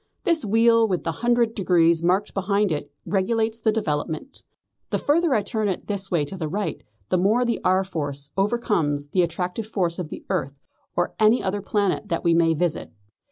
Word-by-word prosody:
This 335 Hz, -6 st, +2 dB
wheel 230 Hz, +2 st, +4 dB
with 185 Hz, -4 st, -1 dB
the 165 Hz, -, -1 dB
hundred 240 Hz, -1 st, +2 dB
degrees 170 Hz, -4 st, +3 dB
marked 185 Hz, +4 st, +1 dB
behind 200 Hz, 0 st, +1 dB
it 145 Hz, -1 st, -3 dB
regulates 220 Hz, +3 st, 0 dB
the 220 Hz, -1 st, +2 dB
development. 160 Hz, -, -3 dB, 0.5 s
The -, -, 0 dB
further 310 Hz, -1 st, +2 dB
I 210 Hz, -, +1 dB
turn 215 Hz, +1 st, -1 dB
it 185 Hz, -, -3 dB
this 195 Hz, -2 st, -2 dB
way 170 Hz, -5 st, +1 dB
to 170 Hz, -, -7 dB
the 160 Hz, -4 st, -3 dB
right, 200 Hz, +6 st, -3 dB, 0.3 s
the 185 Hz, -, +2 dB
more 220 Hz, +7 st, +3 dB
the 235 Hz, -, 0 dB
R. 185 Hz, +1 st, +3 dB
Force 145 Hz, -6 st, -4 dB
overcomes 195 Hz, -9 st, 0 dB
the 180 Hz, -, +2 dB
attractive 180 Hz, +5 st, -2 dB
force 180 Hz, -6 st, -1 dB
of 170 Hz, -4 st, -4 dB
the -, -, -9 dB
earth 140 Hz, -7 st, -2 dB, 0.4 s
or 175 Hz, -, 0 dB
any 220 Hz, +3 st, +4 dB
other 200 Hz, +1 st, -1 dB
planet 205 Hz, 0 st, -1 dB
that 170 Hz, -, -1 dB
we 170 Hz, -, +3 dB
may 165 Hz, -1 st, +3 dB
visit. 170 Hz, 0 st, -2 dB
195 Hz, 190 wpm, -24 LUFS, 170-220 Hz, 0.5 s, wheel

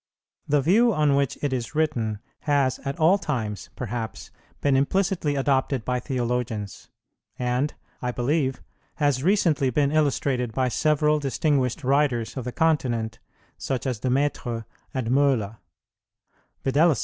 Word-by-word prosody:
The 145 Hz, 0 st, +3 dB
view 220 Hz, -, +4 dB
on 150 Hz, -6 st, +2 dB
which 140 Hz, -2 st, 0 dB
it 145 Hz, -2 st, 0 dB
is 130 Hz, +4 st, -3 dB
written 120 Hz, -9 st, 0 dB, 0.2 s
has 140 Hz, -3 st, +1 dB
at 140 Hz, 0 st, -5 dB
all 175 Hz, +6 st, +5 dB
times, 110 Hz, -, -3 dB
perhaps, 120 Hz, -2 st, -5 dB, 0.3 s
been 140 Hz, -2 st, +2 dB
implicitly 160 Hz, +1 st, +1 dB
adopted 135 Hz, -3 st, +1 dB
by 125 Hz, 0 st, 0 dB
theologians, 120 Hz, -5 st, -3 dB, 0.5 s
and, 125 Hz, +4 st, -1 dB, 0.3 s
I 125 Hz, -, -1 dB
believe, 130 Hz, +1 st, 0 dB, 0.3 s
has 145 Hz, -4 st, +1 dB
recently 165 Hz, -6 st, +2 dB
been 140 Hz, +2 st, +1 dB
illustrated 140 Hz, -5 st, +1 dB
by 130 Hz, +2 st, +1 dB
several 150 Hz, +2 st, +2 dB
distinguished 135 Hz, -2 st, 0 dB
writers 130 Hz, -4 st, +1 dB
of 130 Hz, -3 st, -4 dB
the 125 Hz, -, -3 dB
continent, 125 Hz, -8 st, 0 dB, 0.4 s
such 130 Hz, 0 st, -2 dB
as 125 Hz, -5 st, -1 dB
De 130 Hz, -, -1 dB
Maistre 125 Hz, -4 st, -1 dB, 0.3 s
and 130 Hz, -5 st, -2 dB
Möhler: 125 Hz, -6 st, +2 dB, 1.1 s
viz. 145 Hz, +2 st, +3 dB
135 Hz, 135 wpm, -25 LUFS, 125-150 Hz, 1.1 s, all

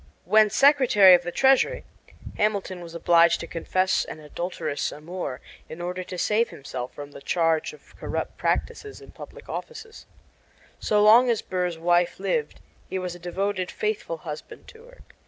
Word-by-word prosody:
When 215 Hz, 0 st, +5 dB
Secretary 240 Hz, -6 st, +6 dB
of 175 Hz, -, +5 dB
the 175 Hz, 0 st, -5 dB
Treasury, 270 Hz, -, +3 dB, 0.5 s
Hamilton 200 Hz, -4 st, -1 dB
was 170 Hz, -1 st, -10 dB
obliged 170 Hz, 0 st, +4 dB
to -, -, -5 dB
confess 185 Hz, +3 st, 0 dB
an -, -, -9 dB
adulterous 155 Hz, -1 st, -4 dB
amour 150 Hz, -3 st, -6 dB, 0.3 s
in 160 Hz, -, -9 dB
order 180 Hz, +1 st, -4 dB
to 180 Hz, 0 st, -8 dB
save 220 Hz, +6 st, +1 dB
himself 130 Hz, -2 st, -7 dB
from 145 Hz, 0 st, -9 dB
the -, -, -12 dB
charge 165 Hz, -1 st, 0 dB
of 455 Hz, -, -18 dB
corrupt -, -, -4 dB
practices 420 Hz, -1 st, -3 dB
in -, -, -14 dB
public -, -, -12 dB
office. 445 Hz, -1 st, -8 dB, 0.7 s
So 210 Hz, -1 st, +2 dB
long 235 Hz, +4 st, +7 dB
as 230 Hz, -3 st, 0 dB
Burr's 180 Hz, -2 st, -2 dB
wife 175 Hz, +2 st, +1 dB
lived 445 Hz, -, -2 dB, 0.3 s
he 190 Hz, -, -3 dB
was 180 Hz, -1 st, -4 dB
a 175 Hz, -, -11 dB
devoted, 185 Hz, +1 st, -3 dB
faithful 210 Hz, -6 st, -3 dB
husband 155 Hz, -2 st, -9 dB
to 455 Hz, +1 st, -16 dB
her. -, -, -18 dB
185 Hz, 160 wpm, -25 LUFS, 170-215 Hz, 0.7 s, long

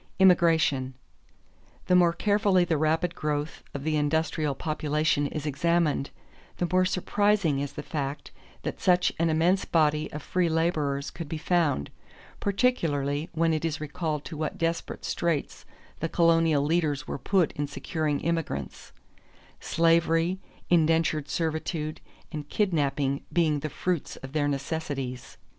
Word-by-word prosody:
Immigration. 165 Hz, -8 st, +4 dB, 0.9 s
The -, -, +1 dB
more 175 Hz, -2 st, +5 dB
carefully 200 Hz, 0 st, +2 dB
the 170 Hz, -2 st, +1 dB
rapid 160 Hz, +3 st, +1 dB
growth 150 Hz, -1 st, -3 dB
of 140 Hz, -, -4 dB
the 155 Hz, 0 st, +1 dB
industrial 150 Hz, -1 st, 0 dB
population 150 Hz, -1 st, 0 dB
is 150 Hz, +1 st, -5 dB
examined, 155 Hz, -1 st, +1 dB, 0.5 s
the 175 Hz, -, 0 dB
more 185 Hz, 0 st, +4 dB
surprising 195 Hz, -4 st, +1 dB
is 140 Hz, -1 st, -4 dB
the 150 Hz, -, -6 dB
fact 145 Hz, -2 st, -4 dB, 0.3 s
that -, -, -4 dB
such 180 Hz, -1 st, +3 dB
an 165 Hz, 0 st, +2 dB
immense 170 Hz, +5 st, +2 dB
body 155 Hz, -2 st, +1 dB
of 150 Hz, -1 st, -6 dB
free 180 Hz, -2 st, +1 dB
laborers 155 Hz, -4 st, 0 dB
could 165 Hz, -4 st, -7 dB
be 160 Hz, -, -3 dB
found, 155 Hz, -, +1 dB, 0.5 s
particularly 160 Hz, -, 0 dB
when 165 Hz, 0 st, +2 dB
it 155 Hz, -, -1 dB
is 160 Hz, -2 st, -1 dB
recalled 155 Hz, 0 st, -3 dB
to 165 Hz, -, -7 dB
what 155 Hz, 0 st, -3 dB
desperate 165 Hz, 0 st, -2 dB
straits 170 Hz, -4 st, -2 dB, 0.3 s
the 165 Hz, -, -2 dB
colonial 165 Hz, -4 st, +3 dB
leaders 150 Hz, -2 st, 0 dB
were -, -, -4 dB
put 180 Hz, +3 st, +2 dB
in 145 Hz, 0 st, -3 dB
securing 150 Hz, 0 st, -2 dB
immigrants, 160 Hz, -, -3 dB, 0.7 s
slavery, 165 Hz, +2 st, +2 dB, 0.3 s
indentured 160 Hz, -3 st, +2 dB
servitude, 160 Hz, -1 st, -2 dB, 0.3 s
and 150 Hz, -2 st, -6 dB
kidnapping 145 Hz, -8 st, 0 dB
being 160 Hz, -4 st, +2 dB
the 155 Hz, +2 st, -4 dB
fruits 175 Hz, +1 st, -2 dB
of 135 Hz, +1 st, -10 dB
their 150 Hz, -2 st, +1 dB
necessities. 135 Hz, -3 st, -4 dB
160 Hz, 135 wpm, -27 LUFS, 145-170 Hz, 0.9 s, more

